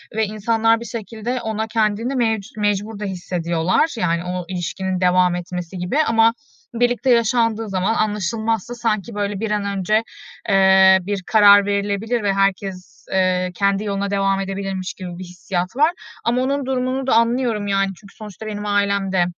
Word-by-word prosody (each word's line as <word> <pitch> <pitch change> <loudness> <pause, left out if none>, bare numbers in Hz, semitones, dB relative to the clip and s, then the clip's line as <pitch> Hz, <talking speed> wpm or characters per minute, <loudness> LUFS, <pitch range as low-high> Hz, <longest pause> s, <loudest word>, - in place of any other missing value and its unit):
ve 220 -1 +2
insanlar 225 +2 +1
bir 235 - -8
şekilde 230 +2 -5
ona 220 0 -3
kendini 225 +3 0
mevcu 220 -3 -1
mecbur 205 +1 -1
da 210 - -4
hissediyorlar. 180 - -1
Yani, 170 -2 0
o 180 -1 -4
ilişkinin 185 +1 -3
devam 180 0 +3
etmesi 180 +1 -6
gibi 180 +11 -2
ama 225 -3 +3 0.5
birlikte 245 +2 +1
yaşandığı 230 -2 +2
zaman 190 +3 0
anlaşılmazsa 220 +2 -1
sanki, 225 -2 -2
böyle, 205 -1 -2
bir 220 0 -2
an 205 -1 0
önce, 215 +4 +1 0.5
eee, 190 -1 +6
bir 195 0 -4
karar 205 -2 +7
verilebilir 205 +3 -1
ve 200 - +1
herkes, 190 -2 -2
eee, 185 -1 +1
kendi 200 0 +1
yoluna 200 -1 -2
devam 195 -1 +1
edebilirmiş 195 -1 -4
gibi 180 -2 -8
bir - - -6
hissiyat 180 +2 -4
var. 305 +4 +4 0.3
Ama 245 +2 +1
onun 275 +1 -1
durumunu 260 0 -2
da - - +3
anlıyorum, 230 -2 +1
yani, 195 -1 +1
çünkü 200 +2 -17
sonuçta 215 -1 -10
benim 210 -1 -5
ailem 200 -1 0
de 180 -2 +2
205 Hz, 160 wpm, -20 LUFS, 190-225 Hz, 0.5 s, karar